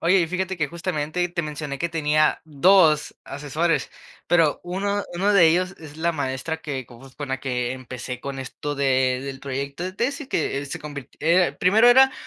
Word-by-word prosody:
Oye, 185 Hz, +3 st, +4 dB
y 170 Hz, -, +1 dB
fíjate 185 Hz, +2 st, -2 dB
que 155 Hz, -, +1 dB
justamente 170 Hz, -1 st, -2 dB
te 175 Hz, -, -1 dB
mencioné 150 Hz, -3 st, -5 dB
que 170 Hz, -, -1 dB
tenía 155 Hz, -1 st, +2 dB
2 155 Hz, 0 st, +4 dB
asesores, 150 Hz, +2 st, -1 dB, 0.4 s
pero 165 Hz, -4 st, +3 dB
uno 200 Hz, +3 st, -2 dB
uno 195 Hz, +4 st, +2 dB
de 185 Hz, -5 st, +7 dB
ellos 185 Hz, +3 st, +1 dB
es 150 Hz, -2 st, -11 dB
la 170 Hz, +1 st, 0 dB
maestra 145 Hz, +2 st, -3 dB
que 140 Hz, -5 st, -5 dB
con 120 Hz, 0 st, -15 dB
uff, 135 Hz, -1 st, -15 dB
la 135 Hz, -1 st, -2 dB
que 125 Hz, -2 st, -2 dB
empecé 125 Hz, -1 st, -7 dB
con 140 Hz, 0 st, -5 dB
esto 145 Hz, +2 st, -5 dB
de 130 Hz, -2 st, +2 dB
del 135 Hz, -1 st, -6 dB
proyecto 140 Hz, +4 st, -4 dB
de 185 Hz, -, -4 dB
tesis 275 Hz, -, -2 dB
que 145 Hz, -, -1 dB
se 135 Hz, -, -5 dB
convirt 145 Hz, -3 st, -8 dB
era 170 Hz, +3 st, +3 dB
primero 215 Hz, +6 st, +5 dB
era 265 Hz, +2 st, +7 dB
155 Hz, 185 wpm, -23 LUFS, 135-180 Hz, 0.4 s, de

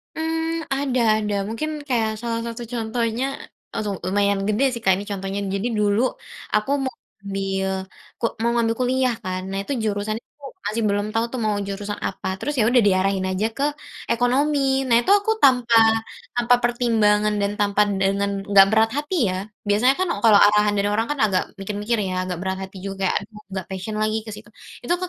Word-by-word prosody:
Mmm, 325 Hz, +1 st, -2 dB
ada 270 Hz, -2 st, 0 dB, 0.2 s
ada 210 Hz, -1 st, -2 dB
mungkin 265 Hz, +8 st, -3 dB, 0.2 s
kayak 230 Hz, -5 st, +1 dB
salah 230 Hz, -1 st, -2 dB
satu 235 Hz, +1 st, -6 dB
contohnya 230 Hz, +1 st, -1 dB, 0.5 s
aduh, 210 Hz, -2 st, -2 dB
lumayan 200 Hz, +1 st, +2 dB
gede 215 Hz, +5 st, +1 dB
sih 235 Hz, -2 st, -5 dB
Kak 190 Hz, -, +5 dB
ini 195 Hz, -, -5 dB
contohnya. 195 Hz, 0 st, -3 dB, 0.2 s
Jadi 200 Hz, +4 st, -1 dB
dulu 205 Hz, +1 st, +2 dB, 0.5 s
aku 210 Hz, +6 st, +1 dB
mau 260 Hz, -, -3 dB, 0.3 s
ngambil 195 Hz, -1 st, -2 dB, 0.5 s
ku -, -, 0 dB, 0.2 s
mau 235 Hz, +1 st, +2 dB
ngambil 230 Hz, -1 st, +1 dB
kuliah 255 Hz, 0 st, +1 dB
kan, 185 Hz, -1 st, -3 dB
nah 195 Hz, -, -3 dB
itu 200 Hz, -, -4 dB
jurusannya 215 Hz, +1 st, -2 dB, 0.2 s
tuh 275 Hz, -2 st, -8 dB, 0.2 s
masih 220 Hz, +2 st, -1 dB
belum 205 Hz, 0 st, 0 dB
tahu 225 Hz, +1 st, +1 dB
tuh 255 Hz, -, -2 dB
mau 210 Hz, -1 st, +1 dB
jurusan 205 Hz, +1 st, -4 dB
apa, 195 Hz, -, -6 dB
terus 295 Hz, -, -2 dB
ya 215 Hz, -, +4 dB
udah 245 Hz, 0 st, +5 dB
diarahin 190 Hz, 0 st, +2 dB
aja 190 Hz, +3 st, 0 dB
ke 280 Hz, -, 0 dB, 0.5 s
ekonomi. 265 Hz, +5 st, +2 dB, 0.3 s
Nah 235 Hz, -, +4 dB
itu -, -, -4 dB
aku 410 Hz, +2 st, 0 dB
tanpa 250 Hz, -3 st, +4 dB, 0.6 s
tanpa 240 Hz, +1 st, +5 dB
pertimbangan 220 Hz, -3 st, +2 dB
dan 200 Hz, 0 st, 0 dB
tanpa 205 Hz, 0 st, +2 dB, 0.2 s
dengan 200 Hz, +1 st, +1 dB, 0.2 s
enggak 195 Hz, -1 st, +8 dB
berat 220 Hz, 0 st, +3 dB
hati 295 Hz, +5 st, -2 dB
ya, 185 Hz, -, -2 dB, 0.3 s
biasanya 215 Hz, +6 st, +4 dB
kan 370 Hz, -, +1 dB, 0.2 s
kalau 220 Hz, -3 st, +7 dB
arahan 210 Hz, 0 st, +4 dB
dari 200 Hz, -, +1 dB
orang 225 Hz, +2 st, 0 dB
kan 295 Hz, -, -2 dB
agak 190 Hz, -3 st, +1 dB, 0.2 s
mikir-mikir 210 Hz, +4 st, -2 dB
ya, 185 Hz, -, -3 dB, 0.2 s
agak 180 Hz, -, -3 dB
berat 190 Hz, 0 st, -2 dB
hati 190 Hz, 0 st, -9 dB
juga, 195 Hz, 0 st, -3 dB
aduh 210 Hz, +1 st, -9 dB
nggak 190 Hz, -2 st, -4 dB
passion 190 Hz, +3 st, -5 dB
lagi 215 Hz, 0 st, +1 dB
ke -, -, -8 dB
situ. 210 Hz, 0 st, -13 dB, 0.4 s
Itu -, -, -2 dB
tuh 365 Hz, +1 st, -4 dB
215 Hz, 185 wpm, -22 LUFS, 200-240 Hz, 0.6 s, enggak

